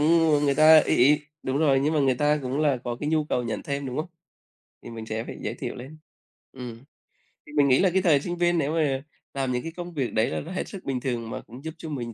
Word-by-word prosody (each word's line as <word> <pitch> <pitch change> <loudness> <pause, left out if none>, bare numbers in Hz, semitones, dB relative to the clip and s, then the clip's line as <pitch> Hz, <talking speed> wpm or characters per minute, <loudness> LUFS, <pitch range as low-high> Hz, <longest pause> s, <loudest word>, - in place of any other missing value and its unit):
nhưng 165 +1 +4
mà 145 0 +3
người 140 -1 +2
ta 155 +2 +7
ấy - - +4
ấy 145 +4 +5 0.2
đúng 130 +1 -1
rồi, 140 -4 +3
nhưng 150 +3 +1
mà 150 - +2
người 135 -2 +3
ta 150 +3 +2
cũng 130 +3 -2
là 145 -4 +2
có 120 -1 -3
cái 150 - -2
nhu 155 -1 +1
cầu 125 -4 -1
nhận 115 -2 -4
thêm 140 -1 -3
đúng 125 0 -5
không? 155 +4 -3 0.7
Thì - - -10
mình 115 -1 -7
sẽ 110 0 -3
phải - - -8
giới - - -3
thiệu - - -5
lên. 135 +6 -10 0.5
Ừm. 125 -2 -9 0.6
Thì 150 - -13
mình 145 -2 +4
nghĩ 130 -1 +4
là 190 - +4
cái 190 - +3
thời 155 -6 +4
sinh 175 +3 -4
viên 175 0 +2
nếu 150 -1 0
mà 140 -5 0 0.3
làm 135 -2 -1
những 125 0 -2
cái 165 - -5
công 175 +1 -8
việc 135 -6 -2
đấy 110 +3 +2
là - - -2
nó 165 - -9
hết 185 - -3
sức 195 -3 -9
bình 135 -2 -2
thường 120 -3 -3
mà - - -5
cũng 125 +4 -13
giúp 160 0 -5
cho 165 -1 -8
mình 120 -6 -5
140 Hz, 280 wpm, -25 LUFS, 125-155 Hz, 0.7 s, ta